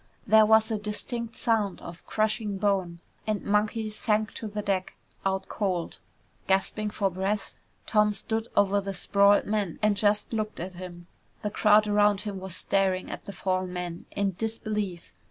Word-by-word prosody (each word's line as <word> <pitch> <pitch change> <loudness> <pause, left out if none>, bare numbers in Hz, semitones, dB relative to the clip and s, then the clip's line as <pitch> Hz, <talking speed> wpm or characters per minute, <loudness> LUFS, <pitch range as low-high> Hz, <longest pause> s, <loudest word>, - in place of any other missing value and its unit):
There 220 -1 +6
was 220 +1 +5
a 215 - 0
distinct 225 +3 -3
sound 215 -5 +1
of 170 +1 -10
crushing 215 -1 0
bone 190 -4 0 0.3
and 215 -1 -1
Monkey 215 +1 0
sank 215 0 0
to 220 - -5
the 210 0 -4
deck, 195 -2 -1 0.3
out 190 0 -1
cold. 185 -5 -2 0.5
Gasping 195 +2 +1
for 200 -2 0
breath, 195 +3 -2 0.3
Tom 210 -1 +3
stood 220 +3 -1
over 200 0 +3
the 195 0 -4
sprawled 200 +1 +4
man 205 -5 -1
and 210 -1 +2
just 205 +2 +2
looked 215 -1 -2
at 185 +2 -5
him. 175 -1 -9 0.4
The 210 - -1
crowd 210 0 +5
around 205 -1 +3
him 205 -3 -5
was 190 -1 -6
staring 190 -1 0
at - - -7
the - - -6
fallen 185 -2 -2
man 175 -1 -5
in 200 -1 -1
disbelief. 210 -5 -3
205 Hz, 165 wpm, -27 LUFS, 190-215 Hz, 0.5 s, There